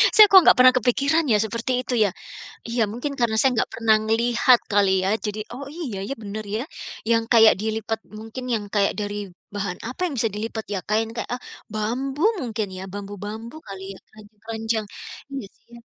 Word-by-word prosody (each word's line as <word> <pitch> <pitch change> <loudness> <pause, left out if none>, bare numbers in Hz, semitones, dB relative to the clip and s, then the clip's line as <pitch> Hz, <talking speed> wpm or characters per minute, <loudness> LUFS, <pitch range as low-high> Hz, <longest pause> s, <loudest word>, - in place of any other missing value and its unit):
Saya 430 - +11
kok 380 - +11
nggak - - +7
pernah 255 0 +8
kepikiran 280 +7 +2
ya 210 - +5
seperti 230 +3 -3
itu 250 - -4
ya? 200 - +2 0.6
Iya, 235 +1 -1
mungkin 280 +5 -4
karena 230 -2 +1
saya 265 - +4
nggak - - 0
pernah 225 -1 +3
ngelihat 235 +2 +4
kali 200 -1 +4
ya - - +1 0.2
jadi, 210 +1 -3
oh 280 +2 -7
iya 295 - -5
ya, 275 - -2
bener 210 +1 -5
ya. 230 - -2 0.5
Yang 230 -1 +3
kayak 225 -2 +7
dilipat 220 +1 -2 0.2
mungkin 225 +4 -7
yang 210 - -2
kayak 200 -1 +3
dari 205 0 -3 0.4
bahan 195 -3 -3
apa 250 - -8
yang 335 - -2
bisa 225 - +2
dilipat 220 +1 -4
ya, 195 - 0
kain 220 +1 +1
kayak, 230 - -4
eee, 245 - -4 0.3
bambu 255 +7 -2 0.2
mungkin 220 -3 -2
ya, - - -6
bambu-bambu 205 +4 -7
kali 195 -1 -8
ya, - - -13
keranjang-keranjang. 220 +1 -5 0.5
Iya 270 -6 -5
sih - - -37
ya. - - -11
225 Hz, 190 wpm, -23 LUFS, 210-245 Hz, 0.6 s, Saya